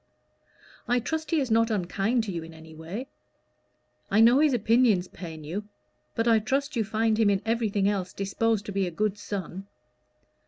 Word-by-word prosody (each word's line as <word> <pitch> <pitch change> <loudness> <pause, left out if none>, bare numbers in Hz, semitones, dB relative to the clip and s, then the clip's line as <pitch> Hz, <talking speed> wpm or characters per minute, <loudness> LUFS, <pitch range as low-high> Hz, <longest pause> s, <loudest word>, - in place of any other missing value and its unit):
"I 245 +1 +2
trust 315 +6 -3
he 325 - +2
is 265 -5 -2
not 230 +1 +3
unkind 210 +4 0
to 210 - -4
you 170 -2 -4
in 165 0 -11
any 160 0 -13
way. 165 +10 -6 1.0
I 205 - +3
know 235 +4 +6
his 305 -1 +4
opinions 225 -5 +3
pain 160 -4 -9
you; 185 +8 -5 0.5
but 230 - 0
I 225 -1 +5
trust 275 +6 -1
you 230 - +1
find 220 +1 0
him 220 -2 +4
in 200 -1 +2
everything 220 -4 +1
else 195 -3 -1
disposed 210 +2 -1
to 205 - -5
be 195 -1 0
a - - -2
good 210 +4 -2
son." 195 -1 -6
215 Hz, 185 wpm, -27 LUFS, 190-230 Hz, 1.0 s, know